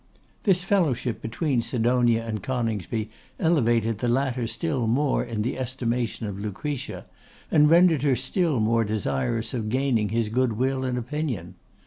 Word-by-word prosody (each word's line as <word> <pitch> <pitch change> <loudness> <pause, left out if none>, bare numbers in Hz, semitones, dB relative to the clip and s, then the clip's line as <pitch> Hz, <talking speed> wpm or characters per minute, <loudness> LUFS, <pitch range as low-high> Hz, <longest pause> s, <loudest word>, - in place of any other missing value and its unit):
This 185 -4 +3
fellowship 145 - 0
between 125 +3 -1
Sidonia 120 -1 +2
and 110 -3 -3
Coningsby 115 -3 -2 0.3
elevated 115 - +2
the 125 - -1
latter 125 -1 0
still 135 -3 -1
more 135 +5 +1
in 115 -3 -3
the 125 +3 -3
estimation 120 -2 -2
of 100 -2 -5
Lucretia, 115 +7 -4 0.5
and 150 -1 +5
rendered 165 -3 +5
her 140 -2 +3
still 140 - 0
more 115 +1 +2
desirous 110 - -1
of 110 -4 -2
gaining 125 -4 +1
his 115 0 0
good 125 +1 +1
will 130 +3 0
and 125 -1 -1
opinion. 135 -2 -3
120 Hz, 145 wpm, -25 LUFS, 115-135 Hz, 0.5 s, and